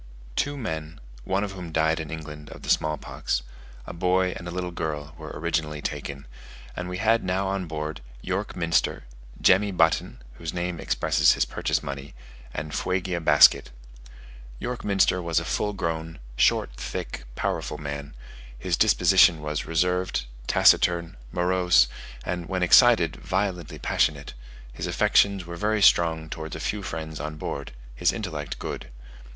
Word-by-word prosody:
Two 145 0 -1
men, 80 - -5 0.3
one 95 +1 0
of 100 - -3
whom 90 -3 -8
died 80 +1 +2
in 80 -2 -5
England 75 -2 -8
of - - -11
the - - 0
small 75 0 +1
pox, - - -3 0.4
a - - -7
boy 90 +1 +1
and 85 - -7
a - - -5
little 90 0 -3
girl, 75 -3 -4
were 80 -2 -9
originally 75 -1 -2
taken; 70 -1 -5 0.5
and 90 0 -4
we 90 - -4
had 115 +3 +2
now 95 +1 0
on 95 -2 -2
board, 75 -2 -4 0.2
York 95 +8 -3
Minster, 85 -2 +1 0.4
Jemmy 100 +2 +4
Button 80 -3 +1 0.2
(whose 80 0 -5
name 90 -1 -2
expresses - - +3
his - - +1
purchase - - -1
money), 70 -1 -7 0.4
and 75 +2 -5
Fuegia 90 -1 -1
Basket. 75 -2 +6 0.9
York 125 - -4
Minster 95 -2 +2
was 85 -2 +1
a - - -6
full 105 - -1
grown, 80 -4 -3 0.2
short, - - +3
thick, - - -5
powerful - - -2
man: 70 -1 -6 0.4
his - - 0
disposition 90 -2 +5
was 75 0 -3
reserved, 90 -3 0 0.2
taciturn, 85 -1 +4 0.2
morose, 90 -7 +3 0.4
and 90 -2 -3
when 95 -1 0
excited 90 - +6
violently 90 -5 -2
passionate; 70 +1 0 0.4
his - - -4
affections 100 -3 +3
were 85 0 -7
very 105 +4 +1
strong 80 -5 +4
towards 80 0 -6
a - - -6
few 100 +6 -2
friends 80 -4 -5
on 75 +2 -4
board; 70 -2 -5 0.2
his 85 +9 +2
intellect 80 -10 -5
good. - - -6
85 Hz, 155 wpm, -25 LUFS, 75-90 Hz, 0.9 s, Basket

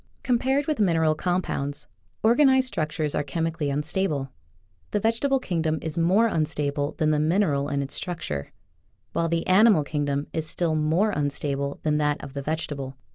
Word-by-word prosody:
Compared 265 +3 +1
with 305 -4 -1
mineral 165 -6 +3
compounds, 155 -4 -2 0.4
organ 245 +6 +5
ized 265 0 +4
structures 155 - -2
are - - +1
chemically 160 +1 -2
unstable. 150 -1 -1 0.6
The 210 - 0
vegetable 230 +6 +1
kingdom 160 -7 -1
is 160 -2 -3
more 185 +7 +3
unstable 145 -6 -1
than 155 -1 +1
the 150 - +2
mineral 155 -3 +1
in 140 -1 -1
its 135 - -6
structure, 120 - -4 0.6
while 165 0 0
the 165 0 0
animal 195 -3 +5
kingdom 145 -1 -1
is 160 -1 -2
still 170 -1 0
more 160 +7 +2
unstable 140 -2 -2
than 150 -1 +1
that 150 -1 +1
of 135 - -8
the 140 - -4
vegetable. 140 -3 -4
155 Hz, 160 wpm, -25 LUFS, 145-190 Hz, 0.6 s, organ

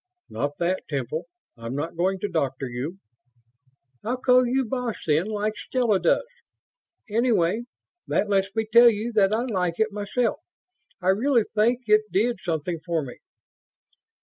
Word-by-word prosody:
"Not 145 0 -3
that, 180 +2 -1
Temple. 145 +2 -3 0.3
I'm 115 +1 -6
not 155 +4 -3
going 185 +3 +1
to - - 0
'Doctor' 140 -7 -2
you." 130 +9 -5 1.1
"I'll 245 +4 -1
call 250 0 +4
you 260 +2 +1
'boss', 245 -1 -3
then, 155 +4 +2
like 215 0 -2
Stella 230 -4 0
does. - - +2 0.8
Anyway, 220 -2 +1 0.4
that 210 - +1
lets 195 -1 +1
me 220 0 0
tell 235 +2 +7
you 225 +2 -2
that 200 -2 +4
I 225 +2 +1
like 180 -8 -1
it 220 0 +2
myself. 210 +3 -1 0.6
I 185 - +2
really 235 +4 +3
think 235 +4 +2
that 210 - +3
it 215 0 +3
did 225 +2 +1
something 165 -1 -2
for 165 -2 -1
me." 125 -3 -9
205 Hz, 155 wpm, -25 LUFS, 170-230 Hz, 1.1 s, tell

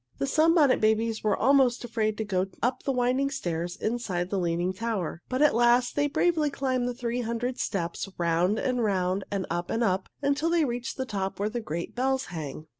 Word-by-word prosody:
The - - -1
Sunbonnet 310 -1 +4
Babies 220 +1 +1
were 210 -2 +2
almost 260 0 +3
afraid 220 -3 -1
to 220 - -1
go 190 -2 0 0.2
up 250 +2 +1
the 275 - -1
winding 255 +2 +1
stairs 175 - -3
inside 195 -6 -2
the 200 - 0
Leaning 175 +1 0
Tower. 195 -6 -3
But 255 +3 +1
at 300 - +5
last 240 +1 +3
they 290 0 +2
bravely 310 +1 +2
climbed 255 -3 -1
the 245 - -4
three 245 0 -2
hundred 240 +2 -3
steps, 195 -1 -2
round 175 +4 +1
and 250 -1 0
round 190 -2 0
and 195 -2 -2
up 175 +1 -2
and 235 - 0
up, 190 -3 0
until 285 +3 +1
they 335 -2 +3
reached 240 -2 -4
the 260 - -2
top 195 -5 -3
where 205 +1 0
the 235 +2 -3
great 170 -3 -5
bells 265 +1 0
hang. 155 -1 -6
230 Hz, 200 wpm, -27 LUFS, 190-255 Hz, 0.2 s, at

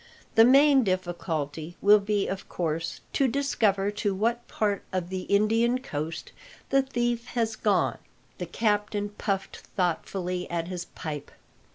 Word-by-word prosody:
"The 225 - +7
main 275 +1 +6
difficulty 175 -4 -3
will 210 +1 +6
be, 205 0 0
of 195 0 -5
course, 165 -1 -2
to 275 - +3
discover 220 -7 +1
to 205 -1 -1
what 235 +4 0
part 205 -2 0
of 185 -2 -2
the 185 -1 -4
Indian 225 +4 +3
coast 160 - -5 0.4
the 275 0 +5
thief 240 -2 -1
has 225 -2 0
gone." 180 - +1 0.4
The 180 - -4
captain 210 +1 0
puffed 195 -2 -3
thoughtfully 180 0 -2
at 170 0 -2
his 180 -2 -4
pipe. 150 -4 -6
200 Hz, 140 wpm, -27 LUFS, 175-225 Hz, 0.4 s, The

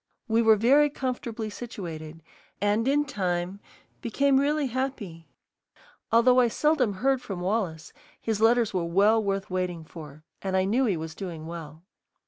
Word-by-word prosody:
We 225 0 +3
were 220 -1 +6
very 275 +8 +4
comfortably 245 -5 -4
situated, 165 -9 -8 0.4
and 205 +4 +1
in 290 +2 +2
time 185 -6 -2 0.4
became 270 +4 +2
really 295 +1 +1
happy. 245 -10 -4 0.8
Although 250 +2 +5
I 245 - +5
seldom 265 -3 +1
heard 265 +6 +1
from 195 -6 -6
Wallace, 180 -4 -2 0.3
his 220 -2 -2
letters 230 -1 +3
were 180 -2 0
well 205 +6 +3
worth 195 -1 -2
waiting 180 -3 -2
for, 155 -2 -11 0.2
and 190 -1 -1
I 185 - +3
knew 240 +7 +2
he 200 -7 +1
was 160 0 -6
doing 165 -3 -7
well. 160 -1 -8
210 Hz, 150 wpm, -26 LUFS, 175-250 Hz, 0.8 s, were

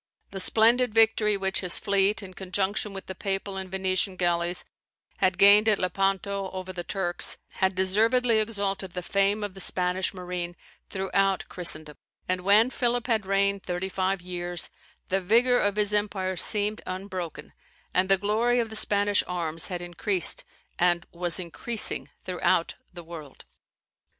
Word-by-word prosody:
The 195 - -5
splendid 230 +3 +3
victory 220 -2 +4
which 190 0 -2
his 180 -3 0
fleet, 200 +1 +1
in 185 -1 -10
conjunction 195 +3 -2
with 195 -1 -8
the 190 - -6
Papal 195 0 -4
and 190 -1 -6
Venetian 190 0 -1
galleys, 175 0 -1 0.5
had 185 0 +1
gained 205 +3 +7
at 210 - +4
Lepanto 195 +1 -1
over 185 0 -6
the 175 -1 -5
Turks, 175 -2 0
had 190 0 0
deservedly 220 +5 +2
exalted 200 -4 -2
the 180 - -5
fame 200 +3 +1
of 205 -2 -4
the 190 - -11
Spanish 180 +1 -1
marine 180 -1 -5 0.3
throughout 195 0 0
Christendom; 155 -4 -1 0.3
and 185 0 -1
when 210 +6 +4
Philip 245 -2 0
had 220 -5 -1
reigned 200 0 +1
thirty 180 +1 -3
five 190 -1 -2
years, 175 -1 -3 0.4
the 195 +1 0
vigour 240 +6 +3
of 205 0 0
his 210 -1 +1
empire 200 -3 -1
seemed 210 +4 +3
unbroken, 185 -3 -6 0.4
and 185 +1 +1
the 195 - +5
glory 220 +5 +1
of 230 -2 -2
the - - -7
Spanish 205 -1 +1
arms 165 -2 -1
had 180 -2 -5
increased, 175 +1 +3 0.4
and 175 -1 +2
was 175 0 +1
increasing 210 +6 0
throughout 180 -2 0 0.2
the 175 -1 -10
world. 160 -4 -11
190 Hz, 155 wpm, -26 LUFS, 180-205 Hz, 0.5 s, gained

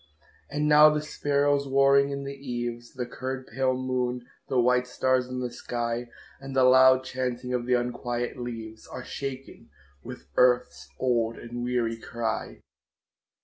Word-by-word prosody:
And 150 +1 -1
now 150 0 +8
the 150 0 0
sparrows 145 -1 +1
warring 140 +1 +4
in 140 0 -4
the 140 0 -5
eaves, 120 -3 -5
The 125 -1 -3
curd 130 +2 -5
pale 130 +2 0
moon, 125 -1 -2 0.2
the 130 - +1
white 125 +1 +3
stars 130 0 +1
in 125 0 -4
the 125 -1 -3
sky, 120 0 -3 0.3
And 135 0 -8
the 130 - +4
loud 130 0 +6
chaunting 125 -1 -3
of 120 -1 -2
the 125 - +3
unquiet 120 0 -2
leaves 115 -2 -7
Are 130 -1 -8
shaken 135 -1 -7 0.3
with 65 - -10
earth's 125 0 +2
old 115 -3 +1
and 120 +1 -6
weary 120 -2 -1
cry. 115 0 -4
125 Hz, 150 wpm, -27 LUFS, 120-135 Hz, 0.3 s, now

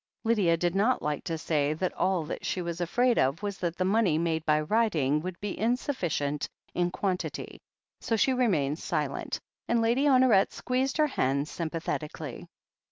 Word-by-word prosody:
Lydia 205 -8 +3
did 175 0 0
not 215 +6 +2
like 150 -1 -2
to 165 - -2
say 150 -2 0
that 180 +4 -2
all 185 -3 +1
that 150 - -6
she - - -1
was 170 0 -4
afraid 240 +8 +2
of 135 +9 +1
was 200 -2 -3
that 175 -1 -2
the 185 - 0
money 195 -5 +3
made 160 -1 0
by 150 0 +4
writing 155 - +1
would 180 +1 -6
be 205 -1 -3
in 230 +6 +1
sufficient 155 - -2 0.2
in 175 0 +1
quantity, 185 0 -3 0.4
so 225 - -1
she 260 +4 +3
remained 170 - +1
silent, 150 -7 -2 0.3
and 235 - +2
Lady 235 +5 +2
Honoret 255 -8 +5
squeezed 260 +2 -1
her 305 - +4
hand 140 - 0
sympathetically. 160 -2 -4
180 Hz, 170 wpm, -28 LUFS, 155-225 Hz, 0.4 s, Honoret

